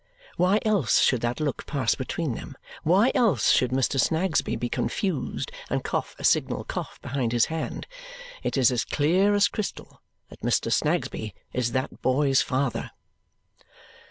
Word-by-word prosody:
Why 185 +4 +3
else 200 - +3
should 125 -3 +3
that 120 +3 -1
look 150 -3 -3
pass 135 -6 +1
between 140 +1 -3
them, - - -8 0.2
why 195 +10 +4
else 190 - +3
should 125 - +3
Mr. 135 +1 +1
Snagsby 165 +4 +1
be 120 - -2
confused 185 - -2 0.2
and - - -1
cough - - -3
a - - -10
signal - - +2
cough - - -6
behind 120 -3 -2
his 120 -1 +4
hand? 160 - -4 0.6
It - - -2
is 130 -2 +5
as 120 -2 0
clear 180 - +2
as 205 -2 +5
crystal 205 +2 -6 0.3
that - - -14
Mr. - - +1
Snagsby 110 -2 -1 0.2
is 120 -2 -1
that 130 +1 -3
boy's 135 +1 +3
father. 130 -1 -1
140 Hz, 155 wpm, -26 LUFS, 125-180 Hz, 0.6 s, is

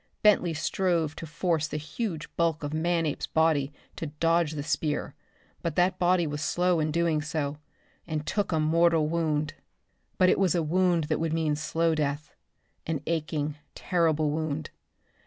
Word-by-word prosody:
Bentley 180 -6 +4
strove 165 -1 0
to 165 - -6
force 160 0 0
the 150 - -4
huge 160 +2 -4
bulk 165 -2 +1
of 145 +1 -3
Manape's 165 -1 0
body 155 -3 +2 0.3
to 165 - -3
dodge 165 +1 +1
the 145 -2 -4
spear; 150 0 -1 0.5
but 165 -3 -2
that 180 +1 +2
body 180 -1 +3
was 150 -1 -3
slow 175 +2 +2
in 155 0 +1
doing 165 -1 +1
so 150 -1 -3 0.5
and 155 -2 -3
took 205 +3 -1
a 160 - +2
mortal 165 0 +3
wound! 155 -2 0 0.6
But 185 - +5
it - - +3
was 190 -3 +3
a 170 - +2
wound 175 +1 +2
that 155 0 -1
would 160 -1 -1
mean 160 -2 +1
slow 160 +2 0
death. 145 -1 -2 0.5
An 160 -3 -1
aching, 155 -2 -2 0.2
terrible 160 -4 +1
wound. 155 -1 -3
160 Hz, 160 wpm, -28 LUFS, 150-170 Hz, 0.6 s, But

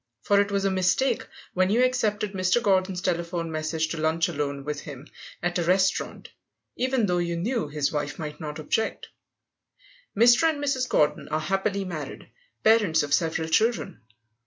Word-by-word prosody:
For 200 0 +4
it 205 - -1
was 200 -1 0
a 195 - +2
mistake 190 +8 +1 0.3
when 185 0 +2
you 235 +5 +3
accepted 215 -5 0
Mr. 185 +4 +2
Gordon's 190 -4 +1
telephone 170 -1 -2
message 155 +1 -1
to 165 - -4
lunch 160 +1 +1
alone 140 -3 -3
with 150 -1 -3
him 140 -1 -9 0.4
at 175 0 0
a - - +1
restaurant, 185 +2 0 0.5
even 255 -2 +1
though 180 -2 +1
you 170 -1 -1
knew 215 - -1
his 145 -1 -1
wife 145 -1 -3
might 150 -2 -6
not 150 -1 -6
object. 190 +8 -2 1.1
Mr. 240 +8 +6
and 315 - -2
Mrs. 275 -3 -1
Gordon 150 - +1
are 155 +1 -1
happily 195 +4 -1
married, 155 -6 -7 0.3
parents 210 -9 +4
of 145 -1 -2
several 160 0 +1
children. 220 - 0
180 Hz, 165 wpm, -26 LUFS, 155-210 Hz, 1.1 s, Mr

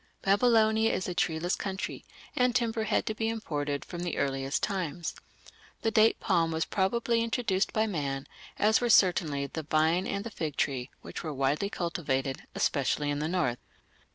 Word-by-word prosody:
Babylonia 220 +1 +4
is 185 - -2
a 180 - -2
treeless 170 +1 0
country, 195 -1 -4 0.3
and 250 -1 +2
timber 230 -2 +1
had - - +1
to 220 - -1
be 225 +1 -1
imported 145 -10 -3
from 175 -1 -6
the 175 -1 -3
earliest 135 0 -1
times. 175 -5 -2 0.7
The 225 - +2
date 220 +1 +4
palm 165 -1 +2
was 160 0 0
probably 230 +4 +1
introduced 225 -4 0
by 220 0 +2
man, 140 -9 -2 0.3
as 215 +3 +3
were 240 - +1
certainly 170 -9 +4
the 160 +3 -5
vine 155 +4 +2
and 200 0 -2
the 230 - -6
fig 155 -7 -4
tree, 130 -2 -1
which - - -6
were 155 - -3
widely 140 +8 +1
cultivated, 145 -8 -2
especially 145 +1 +1
in 145 - -2
the 155 - -1
north. 160 -9 0
175 Hz, 170 wpm, -29 LUFS, 145-220 Hz, 0.7 s, Babylonia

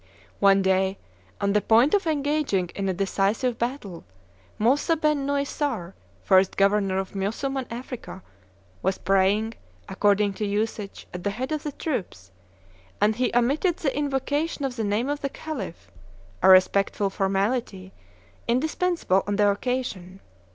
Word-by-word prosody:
One 195 -1 +5
day, 190 +1 +1 0.4
on 200 0 +1
the 210 - +3
point 235 +8 +4
of 400 -4 +2
engaging 285 - 0
in 195 -1 -2
a - - +1
decisive 200 +5 0
battle, 235 -8 -4 0.5
Moussaben 290 +4 +2
Nossair, 280 - -2 0.3
first 190 -1 +3
governor 195 -1 +2
of 190 0 -3
Mussulman 245 +7 -2
Africa, 235 -5 -7 0.6
was 190 - 0
praying, 195 +3 +2 0.3
according 205 +1 +2
to 210 - -3
usage, 205 0 -3
at 180 -1 -6
the 205 - 0
head 250 +8 -4
of 305 -1 -1
the 300 - -4
troops; 185 - -5 0.7
and 210 +1 +2
he 255 - +1
omitted 285 +9 +2
the 275 -5 -1
invocation 290 +2 -1
of 260 -2 -3
the 225 - -2
name 210 +5 0
of 290 0 -2
the 275 - -1
Khalif, 195 - -7 0.5
a 190 - +5
respectful 195 +1 +4
formality 195 0 -1 0.5
indispensable 310 - +1
on 205 - 0
the 205 0 +3
occasion. 200 -5 -3
210 Hz, 135 wpm, -25 LUFS, 195-275 Hz, 0.7 s, One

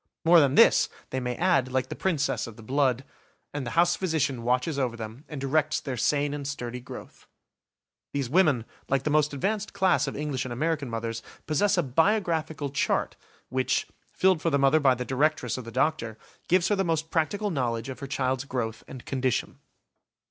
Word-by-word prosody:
More 170 +1 +8
than 140 -2 +3
this, - - +6 0.2
they 130 - -1
may 125 -1 -3
add, 170 -8 +2
like 130 0 -1
the - - -5
princess 155 -10 0
of 115 - -10
the 115 - -13
blood, 130 +1 +1 0.5
"And 140 -4 -4
the 120 - -5
house 175 0 +4
physician 150 -9 -1
watches 125 +5 0
over 125 -3 -1
them 115 +6 -8
and 150 - -6
directs 150 +3 +1
their 135 -3 -4
sane 145 +4 +1
and 145 -2 -4
sturdy 125 -3 -5
growth". 125 - -11 0.8
These 140 -3 -2
women, 145 -6 +3 0.2
like 135 -1 +1
the 150 - -1
most 150 0 +3
advanced 205 +9 -2
class 190 -6 +2
of 135 - -4
English 145 -3 -2
and 130 - -6
American 150 +2 -1
mothers, 115 0 -4 0.2
possess 195 +6 +2
a 175 - +3
"Biographical 160 - 0
Chart", 140 - 0 0.3
which, 130 0 0 0.3
filled 185 -3 +2
for 165 - +1
the 140 - +2
mother 140 +3 +4
by 135 -3 +4
the 125 +1 -4
directress 135 -2 0
or 130 - -4
the 115 -1 -9
doctor, 125 -3 0 0.3
gives 185 +1 +3
her 205 - +3
the 195 - +1
most 160 -2 -1
practical 200 +6 0
knowledge 120 -6 -1
of 130 - -7
her 140 - -6
child's 130 -1 -1
growth 115 -4 -3
and 130 -2 -10
condition. 130 -2 -1
140 Hz, 190 wpm, -27 LUFS, 125-160 Hz, 0.8 s, More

